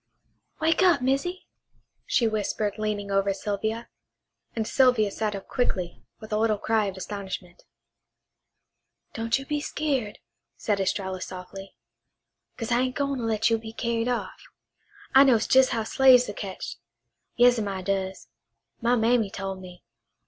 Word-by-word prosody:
"Wake 320 +2 +2
up, 360 -5 +5
Missy," 275 +8 -1 0.6
she 235 - +2
whispered 210 -1 -2
leaning 210 -2 -2
over 195 0 +1
Sylvia; 220 +3 -3 0.7
and 225 -1 -1
Sylvia 250 -6 +3
sat 215 -1 -2
up 195 - -8
quickly, 185 -8 -2 0.2
with 215 0 -8
a - - +2
little 220 -1 +2
cry 220 +1 +1
of 195 -1 -4
astonishment. 190 -2 -7 1.5
"Don't 225 +2 0
you 270 - -8
be 295 +1 -2
skeered," 275 -9 -2 0.4
said 205 -2 0
Estralla 190 -1 -2
softly, 185 +1 -8 0.8
"'cause 230 +1 -4
I 240 - +3
ain' 255 0 0
gwine 280 -1 -1
to - - -4
let 220 0 +1
you 225 - +2
be 220 0 -9
carried 230 0 -1
off. 245 -1 -3 0.7
I 270 - +9
knows 240 -5 +3
jes' 265 0 +6
how 230 -3 -1
slaves 260 0 +5
are 205 - -5
ketched. 190 - -6 0.6
Yas'm, 245 -3 +4
I 190 -2 -4
does. 190 -6 -2 0.5
My 240 +1 +3
mammy 225 -2 +2
tole 195 0 -4
me. 180 -1 -12
220 Hz, 150 wpm, -26 LUFS, 195-245 Hz, 1.5 s, I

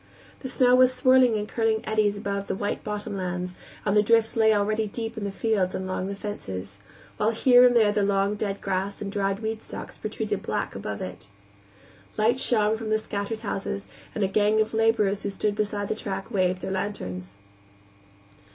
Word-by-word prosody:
The 260 - -6
snow 250 -1 +4
was 255 0 +5
whirling 255 -3 +6
in 210 - -2
curling 220 0 0
eddies 215 -2 +1
above 200 -1 -3
the - - -2
white 205 +1 -3
bottom 210 -1 -4
lands, 180 -1 -3 0.3
and 205 -1 +2
the 210 - +6
drifts 225 +1 +3
lay 220 -1 +5
already 215 +1 +1
deep 225 +2 -5
in 215 -3 -4
the - - -1
fields 195 -3 0
and 190 - -3
along 185 0 -2
the 200 - -4
fences, 100 - -6 0.4
while 210 - +2
here 245 +2 +6
and 245 - +2
there 220 -3 +5
the 205 0 +1
long 200 0 +2
dead 205 -1 -3
grass 195 +1 -2
and 200 -1 -4
dried 195 0 -1
weed 220 0 -3
stalks - - -8
protruded 215 -1 -3
black - - -2
above 100 +1 -5
it. 90 +1 -8 0.9
Lights 235 +5 +2
shone 220 -2 +2
from 220 -1 -5
the 215 - +3
scattered 215 0 -4
houses, 200 0 -4 0.3
and 215 - 0
a - - +3
gang 210 +2 +2
of 220 +1 +1
laborers 220 -3 +2
who 200 - -2
stood 205 +1 -1
beside 205 -1 -2
the - - 0
track 195 -1 -5
waved 185 -3 +1
their - - -3
lanterns. 95 - -4
210 Hz, 195 wpm, -26 LUFS, 195-220 Hz, 0.9 s, whirling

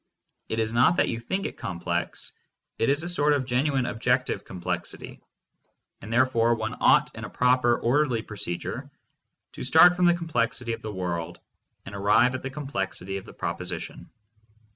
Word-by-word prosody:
It 110 - -2
is 110 0 0
not 125 +8 +4
that - - +2
you 115 - -2
think 190 +12 -3
it - - -5
complex, 85 0 -3 0.5
it 115 - +2
is 145 +3 +1
a - - -3
sort 150 -4 +2
of 140 -3 0
genuine 130 +1 +1
objective 125 +2 0
complexity, 90 -2 -5 0.8
and 105 - -8
therefore 120 -1 +3
one 110 -1 -4
ought - - +4
in - - -8
a - - -6
proper, 125 -1 +3
orderly 125 -2 +1
procedure 95 -4 -5 0.6
to - - -10
start 175 +2 +7
from 180 0 +2
the 175 0 +5
complexity 120 -8 -1
of - - -6
the 110 - -5
world 90 -4 -4 0.5
and 95 - -9
arrive 105 +6 +3
at 130 - -4
the 135 - -4
complexity 95 -9 -4
of 95 - -8
the - - -12
proposition. - - -4
120 Hz, 165 wpm, -26 LUFS, 105-140 Hz, 0.8 s, start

